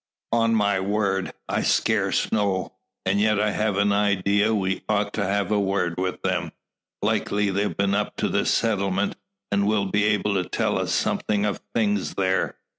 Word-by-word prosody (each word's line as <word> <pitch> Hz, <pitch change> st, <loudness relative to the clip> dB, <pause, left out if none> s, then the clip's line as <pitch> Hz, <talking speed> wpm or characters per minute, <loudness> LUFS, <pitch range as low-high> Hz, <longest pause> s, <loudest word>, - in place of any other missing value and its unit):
"On 115 Hz, 0 st, +3 dB
my 100 Hz, -2 st, +2 dB
word, 95 Hz, -1 st, 0 dB, 0.2 s
I -, -, 0 dB
scarce -, -, +1 dB
know. 100 Hz, -3 st, 0 dB, 0.3 s
And 100 Hz, +2 st, +2 dB
yet 110 Hz, -1 st, +3 dB
I 105 Hz, 0 st, +2 dB
have 105 Hz, -2 st, 0 dB
an 100 Hz, 0 st, +3 dB
idea 100 Hz, +1 st, +2 dB
we 95 Hz, -3 st, 0 dB
ought 105 Hz, -1 st, 0 dB
to 105 Hz, -, -1 dB
have 100 Hz, +2 st, 0 dB
a 105 Hz, -, +3 dB
word 95 Hz, -3 st, 0 dB
with 95 Hz, 0 st, -3 dB
them. 90 Hz, -3 st, -1 dB, 0.5 s
Likely 105 Hz, 0 st, +1 dB
they've 100 Hz, +2 st, -1 dB
been 100 Hz, 0 st, +1 dB
up -, -, -1 dB
to -, -, 0 dB
the -, -, 0 dB
settlement 100 Hz, -3 st, +1 dB, 0.4 s
and 100 Hz, 0 st, +2 dB
will 105 Hz, -2 st, +2 dB
be 100 Hz, +2 st, +1 dB
able 105 Hz, -1 st, +1 dB
to 90 Hz, -, -8 dB
tell -, -, 0 dB
us -, -, -2 dB
something 105 Hz, -1 st, 0 dB
of 105 Hz, -, -2 dB
things 105 Hz, -3 st, 0 dB
there. 95 Hz, -2 st, 0 dB
100 Hz, 180 wpm, -24 LUFS, 95-105 Hz, 0.5 s, On